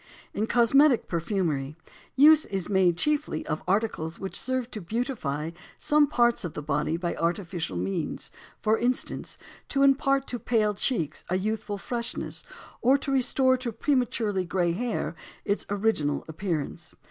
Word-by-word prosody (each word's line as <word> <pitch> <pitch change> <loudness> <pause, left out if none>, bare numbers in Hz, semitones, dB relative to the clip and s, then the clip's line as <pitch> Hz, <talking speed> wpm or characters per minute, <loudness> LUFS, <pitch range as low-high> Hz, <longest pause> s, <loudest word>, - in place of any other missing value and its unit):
In 215 +2 -1
cosmetic 245 +3 +4
perfumery, 165 -5 -1 0.4
use 305 +3 +7
is 195 -3 -3
made 185 -4 +3
chiefly 300 +8 0
of 155 0 -3
articles 185 -5 0
which 190 - -6
serve 255 -2 -2
to 215 - -6
beautify 170 - -3 0.3
some 295 0 +3
parts 240 -5 +2
of 175 - -5
the 150 - -5
body 150 +2 0
by 175 0 -2
artificial 170 - -2
means; 95 +2 -3 0.3
for 220 +1 +2
instance, 250 +1 -1 0.3
to 275 0 +2
impart 275 0 +3
to 245 - -3
pale 215 -4 +1
cheeks 200 - -1
a 180 - +1
youthful 210 +1 -2
freshness 235 +3 -4 0.4
or 260 +3 +5
to 275 - -4
restore 260 0 +3
to 250 -2 -4
prematurely 230 -5 0
gray 175 -1 0
hair 235 +7 -2 0.3
its 200 - -1
original 200 -8 0
appearance. 165 -1 -4
210 Hz, 145 wpm, -27 LUFS, 170-250 Hz, 0.4 s, use